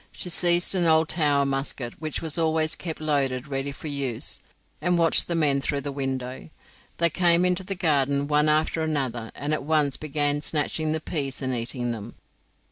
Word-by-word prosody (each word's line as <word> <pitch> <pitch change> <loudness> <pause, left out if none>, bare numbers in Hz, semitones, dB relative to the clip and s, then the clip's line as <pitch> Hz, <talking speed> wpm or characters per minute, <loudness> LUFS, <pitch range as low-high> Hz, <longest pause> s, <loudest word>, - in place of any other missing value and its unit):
She 180 - -3
seized 175 +1 +3
an 180 -3 +2
old 160 0 +4
Tower 145 -4 +2
musket, 135 -3 -2
which 155 0 -4
was 160 -3 -2
always 160 -1 +1
kept 165 -3 -5
loaded 140 -3 -1
ready 135 0 -3
for 150 - -8
use, 140 -5 0 0.4
and 180 0 +2
watched 165 -1 +3
the 170 - -1
men 145 -4 +2
through 140 0 -1
the 140 - -4
window. 130 -1 -4 0.5
They 170 -1 +3
came 175 0 +4
into 180 +1 +1
the 195 +1 -3
garden 140 -5 +1
one 150 +1 +3
after 155 +1 +1
another, 130 -8 -2
and 145 +2 -2
at 155 - -1
once 150 -1 +1
began 145 -1 0
snatching 155 +1 -1
the 160 0 -1
peas 140 -5 -3
and 130 0 -1
eating 120 0 -2
them. 115 0 -7
150 Hz, 185 wpm, -25 LUFS, 135-160 Hz, 0.5 s, old